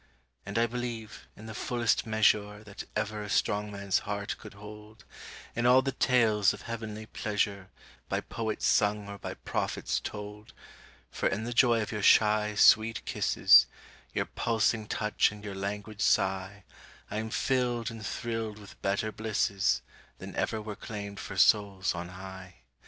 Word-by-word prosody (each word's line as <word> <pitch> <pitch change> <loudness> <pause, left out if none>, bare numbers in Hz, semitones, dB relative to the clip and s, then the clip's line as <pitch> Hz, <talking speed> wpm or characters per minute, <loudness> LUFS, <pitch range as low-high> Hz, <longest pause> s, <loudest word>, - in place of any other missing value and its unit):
And - - -3
I 115 - +4
believe, 115 -2 -5
in 110 - -11
the 110 - -7
fullest 120 +1 0
measure 105 -1 +2
That 105 -1 -9
ever 105 0 -2
a 105 - -6
strong 105 +1 0
man's 100 -1 0
heart 100 0 -4
could - - -11
hold, 105 +1 -12 0.5
In 120 +1 +1
all 130 +1 +6
the 135 - -1
tales 115 -6 +3
of - - -13
heavenly 110 -2 -6
pleasure 105 -3 -2 0.4
By - - 0
poets 110 -2 -3
sung 105 0 +2
or 100 0 -8
by - - -6
prophets - - -2
told; 105 0 -8 0.6
For - - 0
in 105 +3 -2
the 120 +1 -3
joy 120 -2 +4
of 105 - -6
your 105 -2 -3
shy, 105 +1 +4
sweet 110 +2 +5
kisses, - - +5 0.4
Your - - -1
pulsing 110 -1 0
touch 105 -1 +1
and 105 -1 -11
your 100 -2 -5
languid 105 +2 -5
sigh 95 0 +1 0.5
I - - -2
am 110 +1 -3
filled 120 -1 0
and 115 -1 -9
thrilled 115 -1 -3
with 105 -2 -14
better 100 +2 0
blisses 100 - 0 0.3
Than - - -9
ever 110 - -1
were 105 -1 -6
claimed 100 -1 -7
for 100 - -7
souls 100 -1 +3
on 85 0 -6
high. 95 0 -10
105 Hz, 160 wpm, -29 LUFS, 100-110 Hz, 0.6 s, all